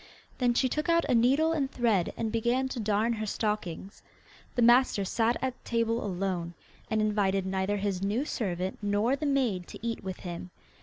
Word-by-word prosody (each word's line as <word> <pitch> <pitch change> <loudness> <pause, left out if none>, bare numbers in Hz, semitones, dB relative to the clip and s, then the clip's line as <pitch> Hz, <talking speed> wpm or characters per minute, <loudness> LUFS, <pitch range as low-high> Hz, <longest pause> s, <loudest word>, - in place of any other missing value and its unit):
Then 245 -2 +2
she 260 - +3
took 300 +6 -2
out 335 0 +3
a - - +1
needle 270 +7 +4
and 290 -5 0
thread, 225 -9 +1
and 220 -1 -2
began 235 +4 +1
to 255 - -4
darn 215 +2 +1
her 215 -1 -3
stockings. 205 -3 -3 0.5
The 245 - +2
master 240 -4 +5
sat 230 +4 +1
at 260 -1 -3
table 230 0 0
alone, 180 -3 -2 0.3
and 220 -1 +1
invited 200 -3 +1
neither 190 +2 -1
his 195 -2 -2
new 210 +8 0
servant 185 - -3
nor 205 +5 +1
the 295 +2 -3
maid 245 -11 0
to - - -9
eat 230 -2 -3
with 190 -1 -6
him. 175 0 -6
220 Hz, 185 wpm, -29 LUFS, 195-245 Hz, 0.5 s, master